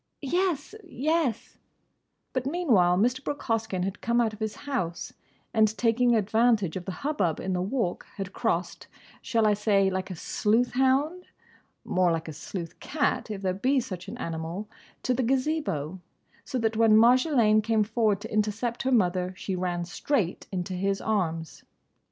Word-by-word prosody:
"Yes! 350 +4 0
Yes!" 295 - -1 0.7
But 255 0 -1
meanwhile 235 - +3
Mr. 250 +6 +1
Brooke 290 - -4
Hoskyn 220 -5 -1
had 195 +2 -4
come 235 +1 +1
out 225 -2 +2
of 215 - -11
his 220 -1 -3
house, 245 -13 -4 0.4
and 220 -1 +3
taking 240 +1 +3
advantage 220 -3 +2
of 180 -2 -5
the 190 - -3
hubbub 290 - 0
in 190 - -2
the 180 - 0
Walk 195 -2 -2
had 195 -1 -5
crossed—shall 215 +6 -2
I 210 - +5
say 200 -2 +2
like 190 0 -3
a 185 - -5
sleuth 220 +8 +1
hound?—more 265 - -1
like 165 0 -2
a 155 - -6
sleuth 165 +3 -7
cat, 290 -5 -1
if 200 -2 -5
there 185 -1 +1
be 260 +8 +2
such 190 -7 -6
an 220 +5 -7
animal—to 170 +7 -5
the 255 - 0
Gazebo. 255 - -1 0.5
So 260 - -3
that 225 -2 0
when 220 -1 +5
Marjolaine 235 -2 +5
came 220 0 +2
forward 215 -2 +1
to 220 - -7
intercept 215 +3 -1
her 265 - 0
mother, 185 -5 +1
she 190 - -3
ran 175 -1 -2
straight 190 - -1
into 185 -1 -3
his 195 +2 0
arms. 165 -7 -2
215 Hz, 155 wpm, -27 LUFS, 185-250 Hz, 0.7 s, I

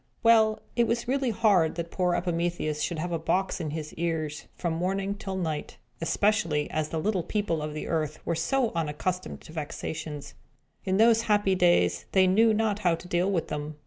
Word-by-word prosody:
Well, 220 -2 +5 0.2
it 235 -1 +3
was 235 +1 -1
really 265 0 +1
hard 200 -8 +3
that 170 0 -4
poor 180 -2 +1
Epimetheus 170 -3 -1
should 155 +3 -1
have 175 +3 -3
a 165 - -1
box 185 +4 0
in 155 - -3
his 155 0 -5
ears 160 -3 -3
from 170 -2 -2
morning 195 +4 -1
till 195 -2 -5
night; 160 -5 -3 0.2
especially 165 -5 +1
as 155 -1 -1
the 160 - -2
little 195 +1 0
people 200 -4 -1
of 150 0 -4
the 155 - -4
earth 155 -2 -1
were - - 0
so 235 +9 +1
unaccustomed 165 +3 -3
to 160 - -13
vexations, 150 -1 -5 0.5
in 190 0 +1
those 225 +1 +5
happy 205 -2 +3
days, 175 -1 +3
that - - -22
they 190 -1 +5
knew 220 +5 +5
not 215 -1 +1
how 175 -5 +2
to 170 - -11
deal 180 +2 +1
with 175 -4 -1
them. 150 0 -4
175 Hz, 195 wpm, -27 LUFS, 160-205 Hz, 0.5 s, Well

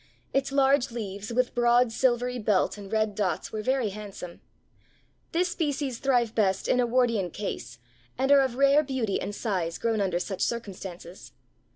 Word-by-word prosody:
Its 275 0 0
large 275 -1 +3
leaves 210 -2 -6
with 250 +1 +1
broad 240 0 +3
silvery 250 +1 +1
belt 205 -3 +1
and 200 -2 -10
red 215 -1 +1
dots, 195 -3 -2
were 215 - -3
very 255 -1 +1
handsome. 195 -4 -9 0.9
This 355 +2 +1
species 285 -7 -2
thrive 245 -4 +1
best 195 -3 +1
in 250 - +2
a 245 - +2
Wardian 230 -6 +1
case 165 - -6 0.4
and 265 +2 +1
are 280 -1 +8
of 260 -3 -1
rare 275 +2 +5
beauty 260 -8 -2
and 205 - -4
size, 180 -8 -2
grown 225 -2 0
under 185 -3 0
such 190 0 -4
circumstances. 190 -6 -5
230 Hz, 165 wpm, -27 LUFS, 200-260 Hz, 0.9 s, are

